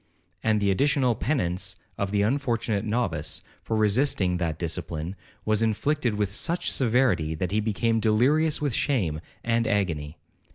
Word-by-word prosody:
And 110 -1 +2
the 100 -1 +2
additional 135 +3 +2
penance 95 - -1 0.2
of 100 - -2
the 100 0 +1
unfortunate 115 -3 0
novice, 105 -9 -1 0.2
for 110 - -2
resisting 105 -4 +2
that 85 -3 -2
discipline, 85 +1 -3 0.3
was 110 0 +2
inflicted 120 +2 +1
with 105 -2 0
such 170 - 0
severity, 110 - +2
that 90 +4 -2
he 105 - +2
became 115 +2 +1
delirious 135 +9 +3
with 145 -4 -1
shame 90 - 0 0.2
and 115 -1 +1
agony. 80 -7 -1
105 Hz, 140 wpm, -26 LUFS, 90-120 Hz, 0.3 s, delirious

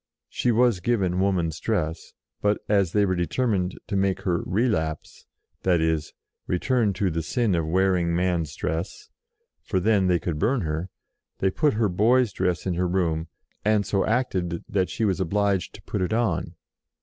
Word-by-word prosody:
She 120 - 0
was 120 -3 +3
given 95 -3 0
woman's 90 -5 0
dress; 85 -8 -2 0.3
but, 105 0 +2
as 100 -5 +2
they 105 +1 +3
were 95 - +1
determined 95 +1 0
to 100 - -4
make 95 -1 +1
her 90 -3 0
"relapse," 90 -7 -1 0.3
that 90 -2 +2
is, 80 -1 0 0.3
return 110 +4 +1
to 95 0 0
the 80 +1 -1
sin 110 +5 0
of 85 -2 0
wearing 90 -1 +2
man's 85 -4 0
dress, 80 +4 -4 0.5
for 95 - -1
then 100 0 +3
they 90 -1 +3
could 80 -1 -3
burn 125 - +1
her, 80 +2 -3 0.5
they 95 - +1
put 150 - +1
her 110 -1 +2
boy's 110 +4 +3
dress 90 -3 -1
in 95 - 0
her 90 +1 0
room, 85 -3 0 0.4
and 105 -1 +2
so 100 0 +1
acted 95 -8 -1
that 95 -2 0
she 110 - -1
was 95 -2 0
obliged 100 0 0
to - - -13
put 100 - -3
it 90 +4 0
on. 90 -7 0
95 Hz, 175 wpm, -25 LUFS, 85-105 Hz, 0.5 s, was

